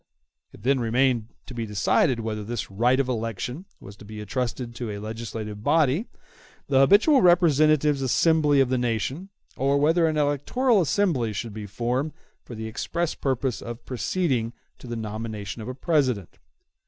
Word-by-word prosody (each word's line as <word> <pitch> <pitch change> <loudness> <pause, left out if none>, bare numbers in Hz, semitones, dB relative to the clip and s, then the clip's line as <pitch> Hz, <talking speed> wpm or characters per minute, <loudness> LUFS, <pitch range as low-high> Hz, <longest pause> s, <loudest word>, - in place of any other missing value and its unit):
It 100 - -16
then 135 +2 +2
remained 120 -1 +1 0.2
to - - -9
be 115 -2 -4
decided 105 +4 +2
whether 110 -1 -4
this 110 -2 -5
right 120 +6 +2
of 135 - +1
election 120 - -4
was 100 - -12
to - - -13
be 105 +1 -9
entrusted 120 +2 -3
to 115 -1 -5
a 105 - -4
legislative 110 -1 -6
body, 160 - +2 0.6
the 135 -2 +4
habitual 205 - +5
representative 155 -5 +4
assembly 150 +1 +3
of 130 - +2
the 130 -1 +1
nation, 125 - -2 0.3
or 140 +2 +1
whether 165 +3 +3
an 155 -1 -1
electoral 150 - +2
assembly 155 - +1
should 105 +2 -5
be 105 -1 -7
formed 125 +8 -2 0.3
for 120 - -9
the 110 0 -6
express 165 +9 -2
purpose 130 -2 -2
of 120 0 -8
proceeding 125 -3 -1 0.3
to - - -11
the 120 - -4
nomination 110 -1 -5
of 110 - -7
a 125 - -5
President. 130 - 0
125 Hz, 165 wpm, -25 LUFS, 110-150 Hz, 0.6 s, habitual